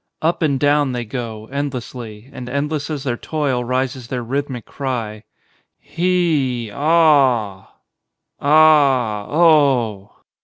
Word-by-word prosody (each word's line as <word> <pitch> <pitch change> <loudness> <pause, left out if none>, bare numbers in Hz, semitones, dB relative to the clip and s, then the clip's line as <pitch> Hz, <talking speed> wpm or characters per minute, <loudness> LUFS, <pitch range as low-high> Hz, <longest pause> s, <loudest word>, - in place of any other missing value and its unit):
Up 165 +3 0
and 140 -4 +1
down 145 -2 +2
they 120 -1 -3
go, 110 -2 -6
endlessly, 125 -5 -6
and 125 -1 -8
endless 145 +2 -2
as 150 -3 -4
their 120 -3 -2
toil 140 -5 -2
rises 130 0 -2
their 125 -1 -4
rhythmic 130 -1 -4
cry. 115 -6 -5 0.5
He, 155 - -1
aw 140 - +2 0.4
— - - -48
ah, 140 -8 +4
oh. 140 - +2
130 Hz, 115 wpm, -19 LUFS, 120-150 Hz, 0.5 s, ah